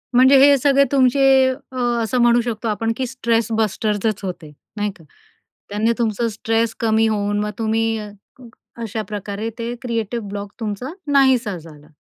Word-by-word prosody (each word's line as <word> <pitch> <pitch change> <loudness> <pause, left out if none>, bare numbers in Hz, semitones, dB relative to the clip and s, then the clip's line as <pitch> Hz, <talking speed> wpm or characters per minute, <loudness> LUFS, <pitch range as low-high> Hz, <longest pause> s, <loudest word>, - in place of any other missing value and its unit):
म्हणजे 260 +2 +6
हे 285 0 +7
सगळे 280 +1 +4
तुमचे 270 0 +3 0.5
अ, 260 - -8 0.3
असं 225 +3 -1
म्हणू 240 0 +4
शकतो 230 -1 -4
आपण, 225 +1 -1
की 260 - -1
स्ट्रेस 235 -3 0
बस्टरच 215 -1 0
होते, 175 -5 -6 0.3
नाही 205 0 -1
का. 165 - -18 0.7
त्याने 210 +3 +1
तुमचं 230 0 0
स्ट्रेस 225 +1 -1
कमी 225 -1 +2
होऊन 205 -1 0
मग 210 0 -1
तुम्ही 225 0 0
अ, 210 -1 -6 0.7
अशा 220 -1 -3
प्रकारे 210 +1 -4
ते 235 0 -4
क्रिएटिव 235 -1 -3
ब्लॉक 200 0 -6
तुमचा 220 +3 -4 0.2
नाहीसा 260 -7 +3
झाला. 150 -2 -14
225 Hz, 155 wpm, -20 LUFS, 210-240 Hz, 0.7 s, हे